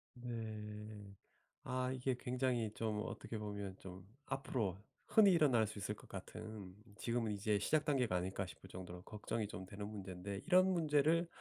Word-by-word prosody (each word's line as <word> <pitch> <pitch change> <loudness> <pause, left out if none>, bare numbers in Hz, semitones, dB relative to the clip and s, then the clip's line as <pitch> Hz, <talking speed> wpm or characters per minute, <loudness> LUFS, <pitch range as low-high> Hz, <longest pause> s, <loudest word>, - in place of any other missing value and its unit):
네. 105 -4 -5 0.5
아 130 0 0
이게 130 0 0
굉장히 125 -3 +1
좀 110 -2 -1
어떻게 115 - -4
보면 100 -2 -4
좀 95 0 -9 0.2
앞으로 120 -8 -1 0.3
흔히 210 -3 +7
일어날 135 -10 +5
수 110 0 -6
있을 105 +2 -2
것 - - -15
같은 100 0 -7 0.2
지금은 115 -1 0
이제 105 0 +2
시작 150 +9 +2
단계가 125 -9 +2
아닐까 95 +2 -1
싶을 80 -4 -11
정도로 90 -1 -7
걱정이 105 +1 -2
좀 95 -2 -6
되는 100 +2 -5
문제인데 100 -1 -5
이런 185 +1 +6
문제를 160 0 +4
110 Hz, 320 characters per minute, -39 LUFS, 100-130 Hz, 0.5 s, 흔히